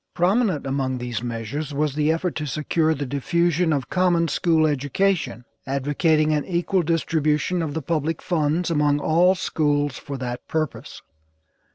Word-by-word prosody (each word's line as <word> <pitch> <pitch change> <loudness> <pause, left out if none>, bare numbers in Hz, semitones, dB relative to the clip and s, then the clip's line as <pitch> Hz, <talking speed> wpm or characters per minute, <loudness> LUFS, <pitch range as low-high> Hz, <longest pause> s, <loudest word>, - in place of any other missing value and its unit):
Prominent 185 - +1
among 135 -1 -1
these 120 -2 -4
measures 120 +5 -4
was 150 -1 0
the 150 +1 +1
effort 165 +2 -1
to 155 -1 -3
secure 155 +2 0
the 140 0 -3
diffusion 170 +5 +1
of 140 -4 -1
common 175 -2 +2
school 160 +1 +2
education, 145 - 0 0.2
advocating 150 +3 +1
an 150 -1 0
equal 180 +1 0
distribution 165 0 0
of 155 -2 -3
the 160 - -3
public 160 +1 -1
funds 165 +1 0
among 150 -2 +2
all 175 +5 +3
schools 145 -5 0
for 140 -2 -6
that 125 -1 -5
purpose. 155 -3 -4
155 Hz, 150 wpm, -23 LUFS, 140-170 Hz, 0.2 s, all